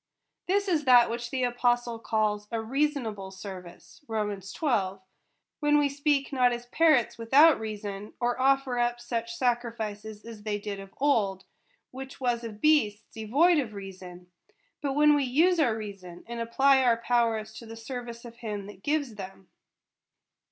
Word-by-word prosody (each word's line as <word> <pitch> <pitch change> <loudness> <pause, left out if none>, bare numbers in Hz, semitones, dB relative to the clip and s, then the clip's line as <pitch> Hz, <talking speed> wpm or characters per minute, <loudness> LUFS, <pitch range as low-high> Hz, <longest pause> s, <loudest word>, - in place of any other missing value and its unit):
This 400 +2 +1
is 320 -6 +1
that 245 -3 +6
which 235 0 -4
the 260 0 -2
apostle 240 -1 0
calls 210 -2 -1
a 230 - -1
rea 270 +7 +1
sonable 215 -9 -6
service 185 +2 -11
(Rom. 210 -3 -2
xii.), 195 - -5 0.9
when 295 -1 +3
we 290 -1 +3
speak 280 0 0
not 250 -2 +4
as 240 0 -4
par 320 +6 +4
rots 240 -4 0
without 280 +7 +6
reason, 210 -2 -6
or 245 +1 0
offer 270 -2 +2
up 240 0 0
such 235 -1 -4
sacrifices 225 -4 -3
as 225 -2 -9
they 210 -1 -2
did 205 -1 -6
of 195 0 -10
old, 210 -9 +1 0.5
which 265 +1 -9
was 240 -2 0
of 215 -3 -7
beasts 225 -9 +2
devoid 290 +11 +3
of 235 -6 -3
reason; 185 -2 -10 0.5
but 280 -2 -1
when 295 +1 +5
we 290 -1 +2
use 325 +8 +3
our 240 -8 +2
reason, 195 -5 -9
and 235 0 -6
apply 265 +4 +3
our 240 -3 +3
powers 230 -2 0
to 230 0 -10
the 225 - -8
service 235 0 -7
of 235 0 -11
him 210 -4 -5
that 200 -2 -12
gives 285 -2 -1
them. 195 -2 -10
235 Hz, 165 wpm, -28 LUFS, 210-270 Hz, 0.9 s, that